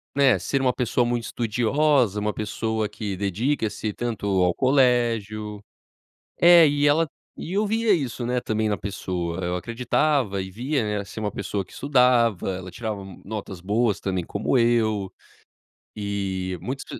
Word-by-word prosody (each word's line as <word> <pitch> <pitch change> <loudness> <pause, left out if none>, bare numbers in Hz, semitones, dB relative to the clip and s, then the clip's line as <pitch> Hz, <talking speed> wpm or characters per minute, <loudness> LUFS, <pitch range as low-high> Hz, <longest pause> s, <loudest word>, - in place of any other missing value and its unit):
né, 130 -9 +4
ser 135 +9 -1
uma 125 -2 +2
pessoa 125 0 +1
muito 120 -1 -1
estudiosa, 120 0 +1
uma 105 0 -1
pessoa 110 0 -2
que 100 -3 -5
dedica-se 110 +2 -1
tanto 120 -4 -4 0.2
ao 90 - +3
colégio. 115 -6 +1 0.8
É, 170 -2 +8
e 145 0 +2
ela 160 +2 +3 0.3
e 175 - -5
eu 205 +1 +1
via 225 -1 +2
isso, 130 -6 -2
né, 125 +1 0
também 110 -1 -1
na 105 - 0
pessoa, 90 -3 -4
eu 90 - -1
acreditava 115 - 0
e 95 - -6
via, 125 +7 -1 0.2
né, 100 - -4
ser 105 - -8
uma 105 -2 -2
pessoa 100 0 -3
que - - -21
estudava, 125 -8 +3
ela 90 0 -8
tirava 110 -3 -5 0.2
notas 100 -3 -6
boas 105 +2 +1
também 95 -3 -2
como 105 +8 0
eu, 110 -5 +2 0.8
e 95 -3 -3
muitos 135 +2 -5
110 Hz, 150 wpm, -24 LUFS, 100-130 Hz, 0.8 s, É